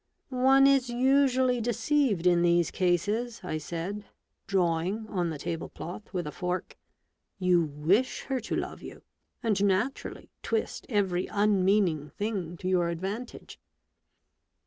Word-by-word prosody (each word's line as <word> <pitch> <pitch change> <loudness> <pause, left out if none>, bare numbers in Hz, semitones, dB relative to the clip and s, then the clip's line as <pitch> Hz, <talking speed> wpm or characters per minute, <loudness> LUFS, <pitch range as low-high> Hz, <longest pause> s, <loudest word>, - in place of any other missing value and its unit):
" - - -45 0.2
One 270 0 +7
is 275 -3 +4
usually 255 0 +3
deceived 240 - +1
in 175 -1 +4
these 170 -1 +3
cases," 205 +7 0
I 155 - -3
said, 175 +6 -5 0.4
drawing 185 +3 0
on 180 -4 -1
the 160 - -4
table 165 +2 -4
cloth 180 +5 -8
with 180 -3 -3
a 150 - -4
fork. 180 +1 -4 0.6
"You 180 -2 +3
wish 160 - 0
her 265 -1 -2
to - - -4
love - - -4
you, - - -10 0.4
and 210 -4 +1
naturally 205 +7 -1
twist 450 - -2
every 190 -5 0
unmeaning 195 -6 +2
thing 190 -2 -4
to 185 - -5
your 180 -2 +2
advantage." 195 +8 -6
195 Hz, 135 wpm, -28 LUFS, 175-235 Hz, 0.6 s, One